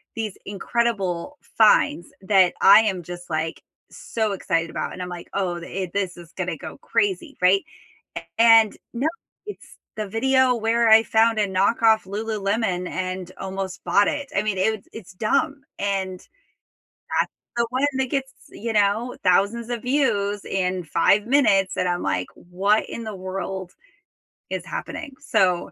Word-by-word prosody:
these 220 -4 -4
incredible 205 +2 -2 0.2
finds 210 -5 +4
that 190 -2 +4
I 200 +2 +9
am 190 -5 -1
just, 175 +1 -9
like, 160 0 -2 0.3
so 220 -2 -3
excited 165 -3 -1
about, - - -4
and 185 - -7
I'm 180 - -4
like, 175 -1 -8
"Oh, 185 -3 -1
i 185 +1 -4
this 190 -3 -2
is 170 -1 -13
gonna - - -3
go - - -9
crazy," 360 -7 -1
right? 185 +2 +4 0.7
And 225 -2 +6 0.2
no, 255 +5 0 0.4
it's 415 - -10 0.2
the 215 -1 -4
video 260 +4 +3
where 230 0 +2
I 220 0 +8
found 225 0 +3
a 205 - +2
knockoff 220 +3 +3
Lululemon 200 -2 -2
and 185 -1 -4
almost 190 -1 -5
bought 200 +4 +3
it. 285 -1 -3
I 195 - +3
mean, 210 -3 -1
it 215 +2 0
it's 205 -5 -10
dumb, 275 +9 0 0.2
and 190 -2 -2 0.8
that's - - -2 0.3
the 235 - +2
one 265 +3 +2
that 260 -2 0
gets, 265 -1 -2 0.2
you 230 +1 -5
know, 210 +4 +1
thousands 200 +6 +2
of 235 - -3
views 205 -7 0
in 185 -1 -1
5 200 +6 +2
minutes, 220 -8 +3
and 180 0 +1
I'm 175 0 -1
like, 90 0 -1
"What 195 +5 0
in 230 - -6
the 215 -2 -5
world 190 0 -5 0.8
is - - -4
happening?" 285 -4 -6
So 180 -2 +1
200 Hz, 155 wpm, -23 LUFS, 185-230 Hz, 0.8 s, I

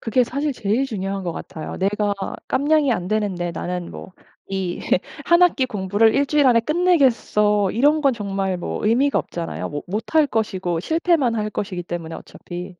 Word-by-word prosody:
그게 245 +2 +2
사실 280 +4 -2
제일 235 +4 0
중요한 195 -3 -3
것 170 - -2
같아요. 160 -1 -7
내가 205 +1 0 0.3
깜냥이 290 -1 +2
안 180 -4 -3
되는데 200 -5 -1
나는 180 +1 -4
뭐 185 - -10 0.3
이 190 -2 -3 0.4
'1 345 +1 +4
학기 325 -7 +4
공부를 205 0 +2
일주일 285 0 +3
안에 235 -2 +5
끝내겠어.' 235 - +2
이런 295 +8 +3
건 275 -2 +4
정말 195 -4 -2
뭐 - - -4
의미가 255 +6 +3
없잖아요. 170 -1 -5
뭐 145 0 -4
못할 225 - +1
것이고 190 -8 -1
실패만 320 - +1
할 215 -1 -1
것이기 195 -4 -4
때문에 170 -2 -6
어차피. 175 +1 -8
215 Hz, 340 characters per minute, -21 LUFS, 185-275 Hz, 0.4 s, 안에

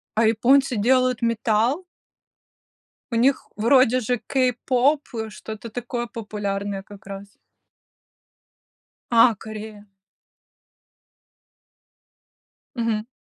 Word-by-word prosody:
А 220 +1 +3
японцы 250 +3 +3
делают 255 +3 +2
металл? 230 - +1 1.3
У 230 - -1
них 260 +4 +2
вроде 255 +2 +4
же 245 +2 0
кей-поп, 255 +3 +1
э, 220 -1 -3
что-то 220 +2 -8
такое 240 +1 -4
популярное 205 -4 -4
как 205 -1 -14
раз. 200 0 -9 1.7
А, 230 -1 +5
Корея. 215 0 -9 2.9
Мгм. 230 -2 -1
230 Hz, 80 wpm, -23 LUFS, 215-250 Hz, 2.9 s, А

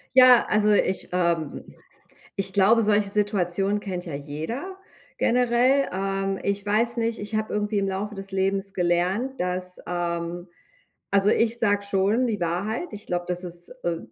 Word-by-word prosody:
Ja, 255 -2 +7
also 210 0 +3
ich 190 -2 +1
ähm, 170 -4 -1 0.7
ich 195 -1 +2
glaube, 205 +4 +4
solche 205 -1 +2
Situationen 200 -1 +2
kennt 180 -3 -6
ja 155 - -6
jeder 160 - -6 0.4
generell. 250 +3 +2
Ähm, 195 0 -2
ich 200 0 -1
weiß 225 +4 +1
nicht, 230 0 -1
ich 205 +1 -5
habe 215 0 -2
irgendwie 210 0 -1
im 195 - -1
Laufe 200 +2 -4
des 195 -1 -5
Lebens 195 +1 -1
gelernt, 185 +9 -1
dass 180 0 +1
ähm, 175 0 -4 0.6
also, 200 0 +3
ich 230 +1 +1
sage 205 -3 +1
schon 200 +5 +1
die 210 -4 -3
Wahrheit. 195 - -2
Ich 210 0 -7
glaube, 175 0 -2
das 180 0 +1
ist 175 0 0
äh, 170 -1 -1
195 Hz, 155 wpm, -24 LUFS, 180-215 Hz, 0.7 s, Ja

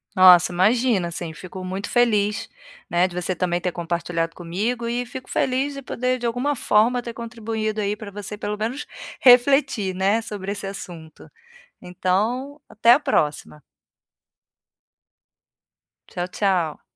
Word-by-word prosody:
Nossa, 180 -2 +7
imagina. 205 0 +2
Assim, 170 -1 -4
fico 185 +3 -9
muito 190 +2 -4
feliz, 210 -4 +1 0.4
né, 175 +2 +3
de 175 - -12
você 180 +1 -1
também 175 -1 -1
ter 180 0 -2
compartilhado 170 -1 -3
comigo 210 +8 -3
e 245 +1 -2
fico 255 +1 -9
feliz 265 +2 0
de 275 - -7
poder, 255 0 -1
de 240 - -3
alguma 250 +5 0
forma, 235 0 +2
ter 235 -1 -7
contribuído 225 -2 -4
aí 205 0 -1
para 210 -2 -9
você 205 +1 -7
pelo 210 0 -4
menos 240 +7 -3 0.3
refletir, 250 -5 +4
né, 195 +4 +2
sobre 200 -3 -5
esse 200 -1 -6
assunto. 170 -5 -9 0.5
Então, 225 +11 -2
até 230 +2 +5
a 275 - +4
próxima. 150 - -1 2.5
Tchau, 175 0 -4
tchau. 180 -6 -1
205 Hz, 140 wpm, -22 LUFS, 180-240 Hz, 2.5 s, Nossa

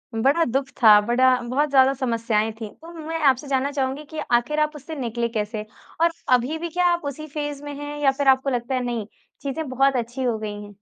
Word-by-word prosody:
बड़ा 275 +9 +3
दुःख 265 +3 -1
था 210 -1 +9
बड़ा 255 +4 +3
बहुत 260 +5 0
ज़्यादा 270 -1 +5
समस्याएँ 230 -4 0
थी 215 - -4
तो 335 - -11
मैं 325 0 -5
आपसे 260 +3 -7
जानना 275 +1 0
चाहूँगी 275 +1 -2
कि 315 - -5
आखिर 240 +6 +2
आप 305 0 0
उससे 300 +2 -8
निकले 235 -3 -2
कैसे? 215 -1 -3 0.4
और 335 0 +4 0.2
अभी 250 +6 +2
भी 340 +1 -4
क्या 355 +2 0
आप 345 - -2
उसी 305 +2 -5
फ़ेज़ 290 -1 -5
में 290 0 -6
हैं 290 0 -6
या 270 - +5
फिर 275 0 -2
आपको 265 +1 +4
लगता 245 +1 -2
है 255 - 0
नहीं, 235 -4 -3 0.4
चीज़ें 290 +2 -4
बहुत 270 +1 +2
अच्छी 240 +2 -3
हो 235 -3 0
गई 210 -1 -5
हैं? 205 0 -12
265 Hz, 220 wpm, -23 LUFS, 235-290 Hz, 0.4 s, था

